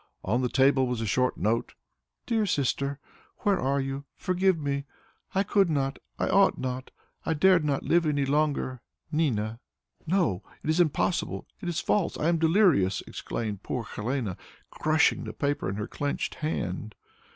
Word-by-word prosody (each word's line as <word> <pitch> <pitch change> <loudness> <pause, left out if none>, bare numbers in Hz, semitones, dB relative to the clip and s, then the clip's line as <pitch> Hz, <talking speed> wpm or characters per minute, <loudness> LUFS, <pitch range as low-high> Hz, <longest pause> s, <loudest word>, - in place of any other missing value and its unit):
On 120 +7 +1
the 125 - 0
table 135 0 +4
was 125 -2 -2
a 115 - -1
short 125 +4 +1
note: 110 +4 0 0.5
"'DEAR 220 -3 +1
SISTER, 140 -3 0 0.4
"'Where 200 -3 +2
are 140 -1 +1
you? 135 +1 -3
Forgive 185 0 +2
me! 140 -2 -2 0.5
I 195 - +3
could 195 -2 +3
not, 135 -3 0 0.2
I - - 0
ought 195 +1 +4
not, 130 0 -4 0.3
I 160 - 0
dared 180 +1 +5
not 145 -2 0
live 170 -1 +3
any 145 -2 +1
longer. 140 -3 0 0.3
"'NINA.'" 115 -8 0 0.5
"No! 165 - +1 0.2
It 155 - +1
is 160 - +1
impossible! 175 +1 +1 0.2
It 175 - -3
is 170 - -1
false! 200 -5 +1
I 155 - +1
am 170 -1 +2
delirious!" 160 - +3
exclaimed 105 -4 -4
poor 125 - -3
Helene, 110 -3 -3 0.3
crushing 155 +1 +2
the - - -6
paper 145 -9 -1
in 95 - -3
her 105 0 -3
clenched 145 -1 -2
hand. 110 - -3
140 Hz, 165 wpm, -28 LUFS, 125-165 Hz, 0.5 s, dared